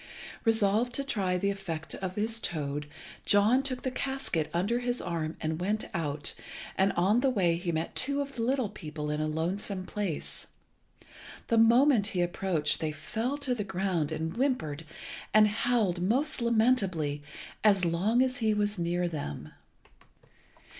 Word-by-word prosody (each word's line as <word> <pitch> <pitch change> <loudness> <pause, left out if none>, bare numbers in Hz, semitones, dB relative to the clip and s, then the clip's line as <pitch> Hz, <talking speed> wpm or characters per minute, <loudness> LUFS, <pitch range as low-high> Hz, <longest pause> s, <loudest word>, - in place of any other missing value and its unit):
Resolved 225 +2 +3
to 275 - 0
try 195 -9 0
the 200 +2 +1
effect 165 -6 -4
of 190 -1 -5
his 225 +2 0
toad, 150 -5 -3 0.4
John 210 +6 +4
took 260 -2 -3
the 260 - -1
casket 265 - -2
under 200 +8 0
his 245 0 -1
arm 165 -2 -3
and 160 +1 -2
went 210 +4 0
out, 150 -4 -2 0.4
and 195 +1 +3
on 195 +7 +3
the 270 +1 +3
way 185 -9 +2
he 175 0 -2
met 160 0 -3
two 280 +2 +1
of 280 -1 -3
the 235 - -3
little 255 0 +1
people 150 -6 -5
in 150 0 -1
a 155 - 0
lonesome 185 +5 -2
place. 195 -7 -4 1.0
The 230 - +4
moment 235 -1 +5
he - - +3
approached 175 -3 0
they 155 -1 -1
fell 230 - -3
to 280 -3 0
the 220 -4 -2
ground, 185 -5 -1
and 160 +1 -3
whimpered 165 - -1 0.5
and 215 0 +8
howled 210 -4 +1
most 260 +10 +1
lamentably 205 - +2 0.4
as 200 -4 +4
long 200 +9 +2
as 260 0 -1
he 220 -4 +1
was 205 -1 0
near 175 +1 0
them. 75 - -5
195 Hz, 160 wpm, -29 LUFS, 165-235 Hz, 1.0 s, and